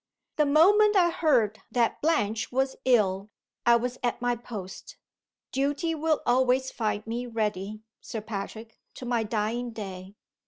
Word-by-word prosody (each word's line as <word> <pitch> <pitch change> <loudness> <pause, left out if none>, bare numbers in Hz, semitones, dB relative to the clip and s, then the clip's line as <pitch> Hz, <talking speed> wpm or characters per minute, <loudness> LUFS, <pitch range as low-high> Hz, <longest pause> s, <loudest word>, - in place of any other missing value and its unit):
The 300 -1 +3
moment 410 +8 +5
I 350 -3 +5
heard 245 -11 +2
that 235 -2 0
Blanche 225 -9 0
was 265 +1 0
ill 205 -5 +2 0.4
I 235 - +7
was 245 +2 -2
at 240 -1 -1
my 245 0 0
post. 210 -5 -9 0.5
Duty 285 +5 0
will 315 0 0
always 255 +1 +2
find 215 -2 -2
me 235 +2 -4
ready, 215 -2 -3 0.2
Sir 225 - -6
Patrick, 220 +1 -7 0.2
to 255 - -8
my 240 -1 +1
dying 225 +3 -2
day. 195 -3 -8
240 Hz, 145 wpm, -27 LUFS, 215-265 Hz, 0.5 s, I